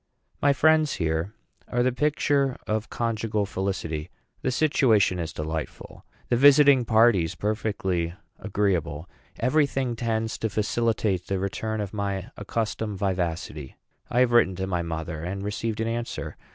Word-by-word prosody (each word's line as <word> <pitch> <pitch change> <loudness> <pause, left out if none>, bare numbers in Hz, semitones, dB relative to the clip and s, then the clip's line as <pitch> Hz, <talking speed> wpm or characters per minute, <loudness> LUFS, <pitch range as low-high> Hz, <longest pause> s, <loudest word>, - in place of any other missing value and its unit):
My 145 - +5
friends 155 +1 +3
here 80 +4 -2 0.3
are 120 0 +1
the 130 - +2
picture 140 0 +1
of 110 0 -2
conjugal 110 -3 -1
felicity. 90 -5 -3 0.3
The - - 0
situation 120 - +3
is 80 -2 -3
delightful 80 0 -6 0.2
the 120 - +2
visiting 140 -1 +6
parties 110 -7 +4
perfectly 95 -5 -1 0.2
agreeable. 90 -7 -1 0.3
Every 145 +6 +3
thing 130 -3 -2
tends 115 -1 -2
to 110 - -1
facilitate 105 -3 0
the 100 - -1
return 105 +3 -2
of 100 -1 -5
my 100 -3 -3
accustomed 105 0 -3
vivacity. 85 -7 -3 0.3
I 120 - +2
have 125 -1 +3
written 120 -6 +4
to 95 +1 -3
my 90 -2 -1
mother, 80 -1 -4
and 95 +3 -4
received 110 +2 -3
an 115 - 0
answer. 115 +1 -4
105 Hz, 140 wpm, -26 LUFS, 90-120 Hz, 0.3 s, visiting